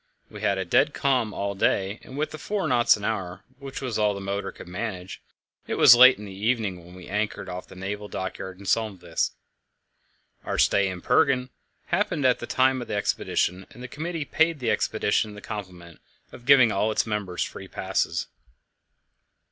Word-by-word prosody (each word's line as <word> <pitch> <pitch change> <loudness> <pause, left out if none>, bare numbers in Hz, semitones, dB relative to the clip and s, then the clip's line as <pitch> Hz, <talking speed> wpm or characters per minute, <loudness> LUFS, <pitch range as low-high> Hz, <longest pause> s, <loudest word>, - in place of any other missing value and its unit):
We - - -9
had 100 - +1
a 95 - -2
dead 120 - +2
calm 130 -6 +1
all 100 0 -3
day, 95 +1 0
and 130 - -11
with 155 +1 -1
the 155 - -8
four 200 -5 -2
knots 120 -5 +4
an 100 - -6
hour, 95 -4 -3 0.2
which 135 -1 -7
was 120 -4 -2
all 105 -1 +2
the - - -5
motor 100 0 -3
could - - -12
manage, 95 -1 -5 0.5
it - - -2
was - - +9
late 130 +2 +8
in 105 - -9
the 100 - -9
evening 100 -3 -1
when 90 +1 -14
we 90 - -11
anchored 105 +1 -2
off 90 0 -6
the - - -13
naval 100 +2 -5
dockyard 95 -1 -5
in 100 - -13
Solheimsvik. 95 -5 0 1.1
Our - - -3
stay 100 -1 +3
in 90 -1 -6
Bergen 130 -2 +2 0.3
happened 175 -5 0
at 125 -1 +4
the 120 - -6
time 130 0 +2
of 120 - -7
the - - -3
exhibition, 95 -2 -1
and 125 - -12
the - - -5
committee 160 +3 -4
paid 160 +2 +2
the 125 -4 -1
expedition 105 -1 0
the - - -9
compliment 90 -6 -8 0.3
of 120 - -13
giving 130 -5 +7
all 105 +2 +1
its - - +1
members 105 -5 -2
free - - -8
passes. - - -1
105 Hz, 190 wpm, -25 LUFS, 95-125 Hz, 1.1 s, was